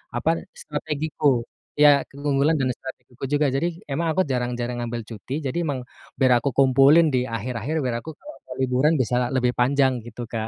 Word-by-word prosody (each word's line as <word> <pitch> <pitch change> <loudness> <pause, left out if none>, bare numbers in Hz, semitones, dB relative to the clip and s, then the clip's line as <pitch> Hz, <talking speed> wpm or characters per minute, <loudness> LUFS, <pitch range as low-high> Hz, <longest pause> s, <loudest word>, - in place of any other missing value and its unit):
apa, - - 0 0.3
strategiku 150 - -1 0.3
ya 145 -1 +6
keunggulan 140 +2 +1
dan 130 -1 +1
strategiku 130 -1 -11
juga. 150 +1 +3
Jadi 140 +5 +1 0.2
emang 165 +5 -1
aku 185 - +2
jarang-jarang 125 -1 -2
ngambil 120 0 -4
cuti, 115 +3 -8
jadi 130 +4 -2
emang 140 -4 -2 0.4
biar 130 -2 +4
aku 140 - -1
kumpulin 135 +4 +6
di 130 - +3
akhir-akhir 115 +5 -4
biar 125 -2 -1
aku 160 - -7
kalo 300 - -11
mau 130 - -7
liburan 130 +4 +2
bisa 125 0 -1 0.2
lebih 125 -1 +2
panjang 135 +1 +3
gitu, 120 +1 -9
Kak, 110 -1 -3
130 Hz, 170 wpm, -23 LUFS, 125-145 Hz, 0.4 s, ya